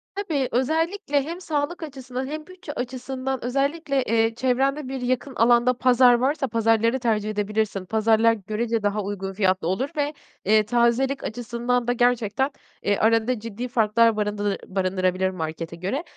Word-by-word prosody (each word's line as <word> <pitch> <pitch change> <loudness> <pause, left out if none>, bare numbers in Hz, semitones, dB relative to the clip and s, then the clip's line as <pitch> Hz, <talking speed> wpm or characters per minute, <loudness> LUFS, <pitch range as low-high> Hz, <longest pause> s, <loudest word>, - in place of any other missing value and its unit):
Tabii, 315 -10 -1
özellikle 315 +3 0
hem 340 +5 -6
sağlık 320 +1 -2
açısından 265 -3 -6
hem 305 +3 -6
bütçe 360 -5 -9
açısından 260 +1 -4
özellikle, 275 +2 0
eee, 225 -1 +1
çevrende 260 +1 0
yakın 255 +2 -1
bir - - -2
alanda 240 +1 +5
pazar 250 -1 +5
varsa 270 +3 +1
pazarları 230 +2 +2
tercih 215 -3 0
edebilirsin. 210 -2 -1
Pazarlar 220 +2 +3
görece 220 +2 -2
daha 205 +1 0
uygun 195 -1 -4
fiyatlı 185 -3 +1
olur 240 +10 -1
ve, 290 +1 0 0.3
eee, 215 +1 +4
tazelik 245 +4 +1
açısından 240 +1 -2
da 245 - +2
gerçekten, 245 +2 +1 0.3
eee, 205 -1 +1
arada 225 +2 +2
ciddi 230 +3 -5
farklar 230 -1 +3
barındır 205 -1 -1
barındırabilir 185 0 0
markete 165 -1 -5
göre. 195 - -3
240 Hz, 145 wpm, -24 LUFS, 215-265 Hz, 0.3 s, alanda